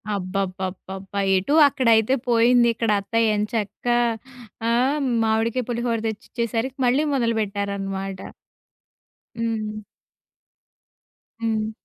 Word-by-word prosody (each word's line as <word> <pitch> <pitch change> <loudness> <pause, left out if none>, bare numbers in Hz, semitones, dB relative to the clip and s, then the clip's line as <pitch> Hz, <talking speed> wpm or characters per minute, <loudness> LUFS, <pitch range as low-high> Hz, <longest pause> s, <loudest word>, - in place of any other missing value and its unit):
అబ్బబ్బబ్బబ్బా! 190 +1 -4 0.2
ఎటు 195 +11 -1
అక్కడైతే 230 -2 +3 0.2
పోయింది. 235 +1 +5
ఇక్కడ 225 -1 0
అత్తయ్య 220 +1 +1
ఎంచక్కా 220 +2 -1 0.7
ఆ! - - +2 0.5
మామిడికాయ 225 +3 +1
పులిహోర 235 0 -1
తెచ్చిచ్చేసరికి 235 +4 -3
మళ్ళీ 260 +5 +3
మొదలు 230 -4 +1
పెట్టారనమాట. 195 -1 -3 1.2
హ్మ్. 215 -2 -2 1.6
హ్మ్. 220 -1 -1
220 Hz, 80 wpm, -23 LUFS, 200-235 Hz, 1.6 s, పోయింది